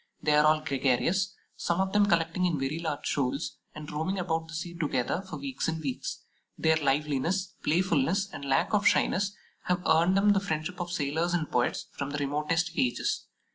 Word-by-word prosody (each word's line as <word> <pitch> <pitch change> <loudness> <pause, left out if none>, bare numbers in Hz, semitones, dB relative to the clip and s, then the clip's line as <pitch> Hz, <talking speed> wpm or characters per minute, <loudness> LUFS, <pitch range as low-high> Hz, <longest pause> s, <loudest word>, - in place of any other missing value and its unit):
They 150 - +1
are 150 0 +6
all 155 0 +4
gregarious, 145 - +1 0.2
some 170 +1 -1
of 190 0 0
them 205 -1 +4
collecting 170 0 +2
in 160 -5 -1
very 135 +4 -2
large 155 -4 -3
shoals, 140 +2 -1 0.2
and 150 -1 -7
roaming 160 +6 -2
about 165 -3 -1
the 165 - -8
sea 170 +2 -4
together 150 0 -1
for 190 -2 -8
weeks 275 -2 -3
and 160 0 -1
weeks. 140 -5 -4 0.3
Their 160 0 +3
liveliness, 150 +6 0
playfulness, 175 +3 +2
and - - -7
lack 135 +9 +1
of 205 -1 +4
shyness 200 +1 +2 0.3
have 180 0 0
earned 170 +4 +4
them 205 +1 +5
the 200 - +4
friendship 160 -2 -3
of 175 0 -4
sailors 165 +1 0
and 160 -3 -2
poets 120 0 0
from 140 -2 -4
the 145 - -3
remotest 150 +4 0
ages. 125 -2 0
160 Hz, 185 wpm, -29 LUFS, 145-180 Hz, 0.3 s, are